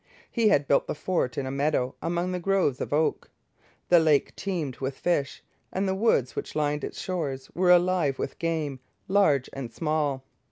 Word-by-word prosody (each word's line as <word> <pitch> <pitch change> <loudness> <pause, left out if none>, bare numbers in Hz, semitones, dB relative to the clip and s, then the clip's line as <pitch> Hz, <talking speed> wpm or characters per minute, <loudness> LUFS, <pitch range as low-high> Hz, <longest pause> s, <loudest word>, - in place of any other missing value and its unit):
He 230 -3 +2
had 145 -9 +3
built 140 - +3
the - - -3
fort 160 -6 -1
in 140 - -1
a 130 - -3
meadow, 140 -2 0
among 175 +2 -1
groves 185 -7 +1
of - - -4
oak. 155 +2 0 0.6
The 175 - +7
lake 155 -3 +2
teemed 170 -9 -3
with 135 0 -4
fish, 145 -6 -1 0.3
and 195 +1 -1
the 190 - +1
woods 190 - +1
which - - -5
lined 150 -1 0
its - - -5
shores 140 -8 -4
were 180 0 +2
alive 175 -6 +4
with - - -5
game, 155 -5 -2 0.3
large 170 -10 +3
and 130 -4 -6
small. 150 -4 -1
155 Hz, 175 wpm, -27 LUFS, 140-180 Hz, 0.6 s, The